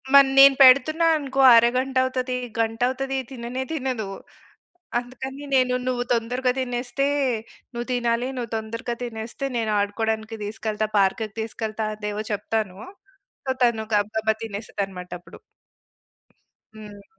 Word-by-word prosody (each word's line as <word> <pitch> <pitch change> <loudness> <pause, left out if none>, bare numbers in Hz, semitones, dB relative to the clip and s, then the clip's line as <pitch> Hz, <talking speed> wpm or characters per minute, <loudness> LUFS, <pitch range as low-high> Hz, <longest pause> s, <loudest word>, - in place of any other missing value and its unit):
మరి 275 -1 +8
నేను 275 0 +9
పెడుతున్నా 310 +6 +6
అనుకో 275 -2 -1
అరగంట 255 +3 +3
అవుతది. 255 -1 -2 0.2
గంట 225 0 0
అవుతది. 270 +1 -3
తిననే 250 +1 -4
తినదు. 255 -8 -3 0.9
అందుకని 260 +3 -8
నేను 255 -1 +3
నువ్వు 245 -1 0
తొందరగా 250 +2 0
తినేస్తే 250 +2 -1 0.7
నువ్వు 240 +1 -5
తినాలి. 240 0 0
నువ్వు 235 -3 -4
తొందరగా 230 +2 -4
తినేస్తే, 235 +3 -5
నేను 220 -2 -1
ఆడుకోవడానికి 220 +2 -2
తీసుకెళ్తా. 215 0 -3
పార్క్‌కి 200 +3 +2
తీసుకెళ్తా. 220 0 -4
అవేవో 210 0 -4
చెప్తాను. 210 -2 -2 0.7
సో 265 - 0
తను 235 -2 +2
గబగబా 220 +1 +1
తినేస్తదన్నమాట 200 -4 -5
అప్పుడు. 175 - -14 1.4
హ్మ్. 205 -2 -11
235 Hz, 115 wpm, -24 LUFS, 220-255 Hz, 1.4 s, నేను